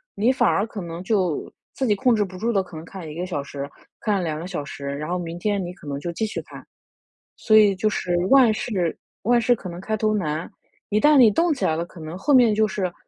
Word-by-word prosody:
你 220 +4 +2
反 260 - +2
而 180 +6 +1
可 215 -3 -7
能 170 0 -6
就 185 -6 0 0.2
自 265 - -2
己 210 - +3
控 250 +3 +3
制 210 - +2
不 185 -1 -10
住 230 +4 0
地 195 -4 +2
可 180 -2 -13
能 155 - -7
看 185 -2 -9
1 - - -7
个 175 +2 -3
小 175 -6 -3
时、 140 0 -6 0.3
看 205 -4 +1
2 155 -2 -2
个 170 - -6
小 175 -6 -4
时， 140 0 -8
然 145 +3 -4
后 180 - 0
明 170 0 -5
天 200 0 0
你 175 0 -6
可 155 - -15
能 140 -1 -3
就 170 +3 -4
继 220 +6 -2
续 215 - -4
看。 - - -12 0.7
所 215 - +3
以 210 -2 +6
就 215 +3 +1
是 180 -4 -1
万 260 -5 +7
事 185 -7 -2 0.3
万 240 +3 +3
事 245 +1 +3
可 200 - -8
能 175 0 -7
开 215 +3 -2
头 215 0 +1
难， 160 -5 -2 0.4
一 210 +1 +2
旦 300 +3 +5
你 240 -4 +8
动 335 - +2
起 275 - -3
来 160 - +2
了， 170 - -2
可 175 - -15
能 155 +2 -7
后 290 +9 +1
面 240 -4 +6
就 215 +1 +3
是 190 -3 -2
190 Hz, 275 characters per minute, -23 LUFS, 170-220 Hz, 0.7 s, 你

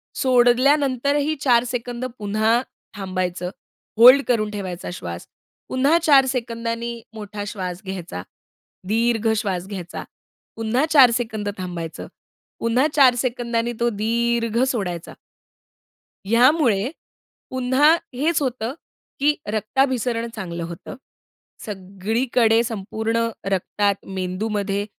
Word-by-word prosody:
सोडल्यानंतरही 275 +3 +3
4 240 -3 +4
second 245 0 -4
पुन्हा 215 +3 +2 0.4
थांबायचं, 185 -2 -3 0.5
hold 255 +4 +9
करून 215 -4 +1
ठेवायचा 185 -4 -5
श्वास. 85 - -7 0.4
पुन्हा 275 +6 +3
4 280 -4 +6
सेकंदांनी 235 -2 -3
मोठा 210 -1 -6
श्वास 185 -3 -5
घ्यायचा, 175 - -5 0.7
दीर्घ 225 +1 +1
श्वास 190 -4 -2
घ्यायचा. 185 -4 -6 0.5
पुन्हा 225 +6 0
4 265 -6 +8
सेकंद 220 -4 -3
थांबायचं. 175 -3 -6 0.5
पुन्हा 245 +5 +2
4 260 -4 +6
सेकंदांनी 240 -1 -1
तो 235 0 +2
दीर्घ 230 +1 0
सोडायचा. 180 -9 -3 1.1
ह्यामुळे 240 -2 +4 0.6
पुन्हा 260 +4 +3 0.2
हेच 300 +5 +1
होतं, 255 -2 -2 0.5
की 295 +2 +3 0.2
रक्ताभिसरण 235 +1 0
चांगलं 170 -5 -5
होतं. 170 0 -8 0.7
सगळीकडे 220 +4 +1
संपूर्ण 225 +1 -2 0.2
रक्तात, 200 +2 0
मेंदूमध्ये 200 +2 -2
230 Hz, 95 wpm, -22 LUFS, 200-250 Hz, 1.1 s, hold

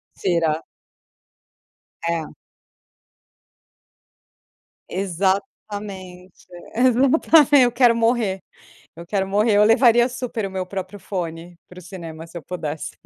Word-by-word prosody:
Será 165 -3 0 1.4
É. 165 -2 -1 2.6
Exatamente. 190 +1 -1 1.2
Exatamente. 270 +4 +4
Eu 245 - +2
quero 240 -1 +4
morrer, 225 -5 0 0.5
eu 170 - -10
quero 190 +1 -1
morrer. 205 +2 +2
Eu 210 - +6
levaria 240 +2 +5
super 245 -4 -4
o - - -10
meu 190 -1 -3
próprio 190 +1 -7
fone 175 -2 -6
para 180 - -15
o - - -13
cinema 165 -3 -9
se 165 +1 -18
eu - - -7
pudesse. 160 -4 -5
195 Hz, 105 wpm, -21 LUFS, 175-235 Hz, 2.6 s, Eu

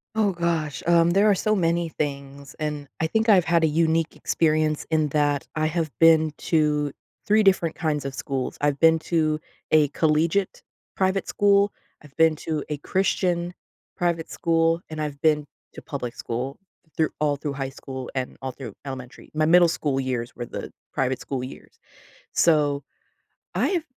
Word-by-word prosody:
Oh 215 -2 +2
gosh. 170 -4 -2
Um, 170 0 +4
there 200 +4 +4
are - - +6
so 215 +3 +1
many 170 -2 +1
things, 140 -2 -5
and 150 -2 -3
I 160 - +1
think 220 +6 +1
I've 190 -5 +6
had 170 -1 +3
a - - +5
unique 160 +1 +1
experience 155 -1 +1
in 155 -1 +2
that 145 -1 +1
I 155 - +1
have 160 0 -1
been 160 -1 +6 0.2
to 150 -2 +2 0.3
3 215 +1 +4
different 185 -5 +3
kinds 150 -3 -1
of 135 - -4
schools. 135 -1 -3
I've 145 -1 +1
been 165 0 +5
to 155 -2 +1 0.3
a 155 -2 +5
collegiate 160 +6 +1 0.3
private 190 0 0
school. 200 0 +3 0.3
I've 145 -2 -17
been 160 -1 +4
to 155 -1 -3
a 150 - -2
Christian 175 +1 0 0.4
private 170 -3 -1
school, 165 0 +1
and 155 -1 -5
I've 145 -2 -4
been 150 -2 +3 0.3
to - - -9
public 125 -5 -5
school 125 +4 -4 0.4
through 160 - +2
all 150 -1 +2
through 145 0 -4
high 135 -1 -3
school 130 -1 -8
and 130 -1 -4
all 130 - -2
through 120 -5 -9
elementary. 130 -2 -8
My 155 0 +1
middle 175 +2 +6
school 145 -4 -1
years 130 -1 -3
were 120 - -5
the - - -7 0.2
private 130 0 -1
school 130 -2 -4
years. 130 - -11 0.5
So, 145 -4 +3 0.7
I've 355 -4 +1
155 Hz, 170 wpm, -24 LUFS, 140-170 Hz, 0.7 s, are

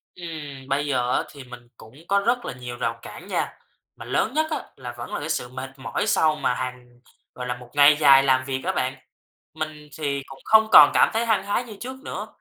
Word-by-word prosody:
Ừm, 150 -6 -8
bây 140 +1 0
giờ 125 -3 0
á, - - 0
thì 140 -2 -11
mình 125 -1 -12
cũng 110 +2 -15
có 200 0 +3
rất 240 +4 0
là - - -4
nhiều 125 -1 -8
rào 115 -1 -2
cản - - -11
nha. - - -2 0.4
Mà - - -10
lớn - - 0
nhất 315 +1 +1
á, - - -2
là 120 -2 -8
vẫn 120 - -7
là - - -2
cái 155 - -5
sự 125 - -1
mệt 130 +1 -7
mỏi 130 - -3
sau 155 -1 +3
mà 140 - 0
hàng 125 -1 -7 0.4
gọi 125 0 -6
là, 125 - -2
một 125 -1 -14
ngày 145 +1 +6
dài 140 -2 +7
làm 130 -1 +2
việc 130 -1 -3
á 190 - 0
bạn. 130 -5 -1 0.6
Mình 155 -1 -6
thì 140 -3 -2
cũng 135 - -12
không 220 0 +5
còn 145 - +10
cảm - - +5
thấy 225 +1 0
hăng 215 -4 +2
hái 205 +4 -1
như 225 -4 -10
trước 260 +2 -7
nữa, - - -5
140 Hz, 235 wpm, -24 LUFS, 125-165 Hz, 0.6 s, còn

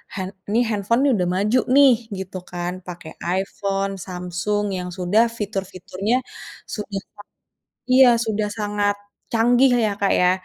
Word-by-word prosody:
hand 190 0 -4 0.2
ni 235 - +4
handphone 215 +4 +1
nih 280 - +4
udah 180 - +1
maju 210 +6 +2 0.2
nih 280 -3 +8 0.3
gitu 190 0 -6
kan. 175 0 -3
Pakai 170 -2 -8 0.3
iPhone, 195 0 -2
Samsung 180 +3 -2
yang 180 0 -4
sudah 195 +6 +3
fitur-fiturnya 195 +1 -3 0.6
sudah 205 -2 -4 0.2
sa 205 - -11 0.7
iya 260 0 +8 0.2
sudah 215 -1 -1
sangat 205 -1 0 0.4
canggih 245 +3 +4
ya, 210 - +1
Kak, 200 - +3
ya. 180 0 +5
200 Hz, 140 wpm, -22 LUFS, 185-220 Hz, 0.7 s, nih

